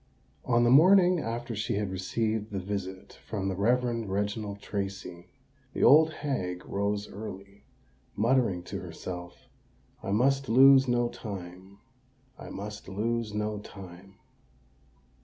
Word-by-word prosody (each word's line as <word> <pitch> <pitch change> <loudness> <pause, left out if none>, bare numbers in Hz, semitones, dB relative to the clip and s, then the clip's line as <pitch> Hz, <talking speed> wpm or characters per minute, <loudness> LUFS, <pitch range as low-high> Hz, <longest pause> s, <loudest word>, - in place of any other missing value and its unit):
On 120 -1 +3
the 120 - +4
morning 180 +4 +6
after 120 -2 -4
she 105 0 -2
had 100 -2 -2
received 110 +3 -2
the 100 - -4
visit 95 0 -6
from 95 -3 -3
the 95 - -2
Reverend 115 +1 0
Reginald 100 +1 -2
Tracy, 95 -4 -5 0.5
the - - -1
old 155 +3 +7
hag 95 - -4
rose 100 +1 -2
early, 100 -1 -9 0.5
muttering 115 -5 +1
to - - -6
herself, 90 -1 -8 0.5
"I - - -6
must 135 +6 +2
lose 135 +2 +7
no 120 -1 +2
time—I 115 +7 -11
must 105 0 -7
lose 110 +2 -2
no 105 0 -2
time." 95 -1 -12
105 Hz, 120 wpm, -28 LUFS, 95-120 Hz, 0.5 s, old